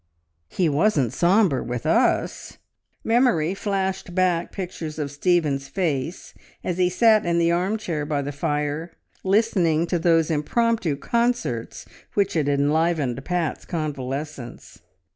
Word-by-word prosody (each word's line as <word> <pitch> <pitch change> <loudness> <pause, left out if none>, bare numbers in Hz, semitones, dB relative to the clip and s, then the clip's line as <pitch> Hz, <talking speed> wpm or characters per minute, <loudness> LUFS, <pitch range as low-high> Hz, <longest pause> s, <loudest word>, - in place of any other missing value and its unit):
"He 180 - +1
wasn't 145 - +2
sombre 180 - +3
with 120 0 -5
us!" - - +1 0.5
Memory 225 -9 +2
flashed 190 -3 -3
back 180 -2 +1
pictures 175 -5 -6
of 145 -2 -3
Stephen's 145 -3 +1
face 160 -1 -3 0.3
as 180 0 -3
he 180 -1 +3
sat 215 +3 +4
in 170 0 0
the 170 0 +3
arm 185 +5 0
chair 165 -8 -3
by 145 -1 -1
the 145 - -4
fire, 150 +3 -2 0.3
listening 190 -6 +2
to 175 0 -1
those 165 -1 +3
impromptu 175 +3 +1
concerts 235 - -1 0.3
which 200 -1 +1
had 150 -4 +1
enlivened 145 -2 +1
Pat's 175 -2 -2
convalescence. 145 -4 -5
165 Hz, 125 wpm, -23 LUFS, 145-185 Hz, 0.5 s, sat